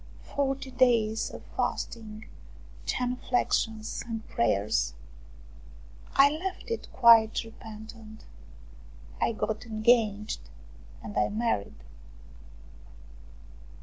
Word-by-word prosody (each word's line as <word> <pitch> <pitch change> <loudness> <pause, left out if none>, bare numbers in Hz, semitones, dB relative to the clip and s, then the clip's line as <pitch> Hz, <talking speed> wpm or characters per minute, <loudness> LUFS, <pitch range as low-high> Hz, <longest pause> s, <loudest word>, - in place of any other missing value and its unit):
Forty 270 -1 -2
days 230 -4 +3
of - - -10
fasting, 215 -2 -3 0.6
genu 250 0 0
flexions 225 -3 0
and 225 -1 -6
prayers. 100 - +1 1.2
I 280 +1 +7
left 370 +8 -5
it 460 - -3
quite 230 -3 +6
repentant. 220 0 -11 1.0
I - - +3
got 220 +1 -3
engaged 215 - +1 0.5
and 105 - -7
I 105 - +2
married. 210 - -2
225 Hz, 80 wpm, -28 LUFS, 215-245 Hz, 1.2 s, I